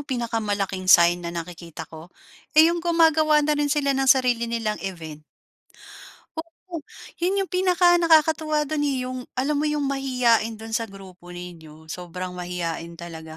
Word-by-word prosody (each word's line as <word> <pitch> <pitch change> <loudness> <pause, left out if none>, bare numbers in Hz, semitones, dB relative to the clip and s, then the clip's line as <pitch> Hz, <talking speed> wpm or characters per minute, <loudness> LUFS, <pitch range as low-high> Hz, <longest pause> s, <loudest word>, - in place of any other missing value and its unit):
pinakamalaking 215 -8 -3
sign 175 0 +6
na 170 - -5
nakikita 170 -1 -7
ko, 160 +2 -12 0.5
eh, 320 +2 +7
yung 345 - -2
gumagawa 320 -3 +3
na 300 - +2
rin 295 -1 0
sila 280 -1 +1
ng 270 0 0
sarili 245 -3 +3
nilang 225 -2 -2
event. 160 -5 -7 1.1
Oo, 330 +1 -8 0.4
'yon 375 +3 +1
yung - - -15
pinaka 360 -1 +4
nakakatuwa 315 -2 +3
dun 295 +1 -3
eh, 265 -3 -1
yung 255 0 -6
alam 285 +3 0
mo 305 - +1
yung 300 -1 -1
mahiyain 250 -5 +1
dun 225 +1 -10
sa 230 0 -1
grupo 190 -3 -14
ninyo 165 -3 -10
sobrang 180 +1 -6
mahiyain 170 -2 -5
talaga. 160 -2 -9
235 Hz, 155 wpm, -24 LUFS, -, 1.1 s, eh